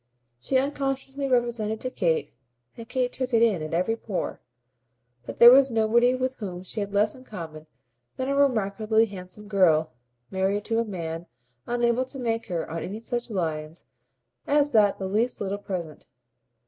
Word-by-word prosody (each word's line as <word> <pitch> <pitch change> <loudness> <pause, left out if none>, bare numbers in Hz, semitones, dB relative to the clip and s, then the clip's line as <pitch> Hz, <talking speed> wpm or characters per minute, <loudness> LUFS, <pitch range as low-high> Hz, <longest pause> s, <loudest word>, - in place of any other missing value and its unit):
She 260 - +1
unconsciously 275 0 -2
represented 235 -4 0
to 255 - -3
Kate, 165 -8 0 0.4
and 230 0 -10
Kate 250 -1 -1
took 255 -2 -1
it 230 - +5
in 210 -8 +2
at 155 - -5
every 185 +6 +1
pore, 210 -4 -4 0.9
that - - -6
there 235 +1 +10
was 270 +1 +6
nobody 235 +2 +3
with 260 0 -2
whom 185 -4 -6
she 200 +4 -5
had 200 -1 -3
less 210 +1 +2
in 255 - -14
common 160 -8 -8 0.5
than 260 - -2
a 275 - 0
remarkably 220 -4 +2
handsome 195 0 -9
girl 165 -7 +3 0.4
married 195 +2 0
to 225 -1 +1
a - - +2
man 170 -4 -5 0.4
unable 240 +1 +1
to 265 +2 -9
make 230 -2 -2
her 170 -2 -3
on 165 +1 -4
any 205 +6 -5
such 240 +1 -4
lines 160 -5 -3 0.6
as 290 0 +3
that 210 -3 +4
the 190 - -4
least 220 +6 0
little 200 0 -3
present. 175 -6 -6
220 Hz, 170 wpm, -26 LUFS, 185-250 Hz, 0.9 s, there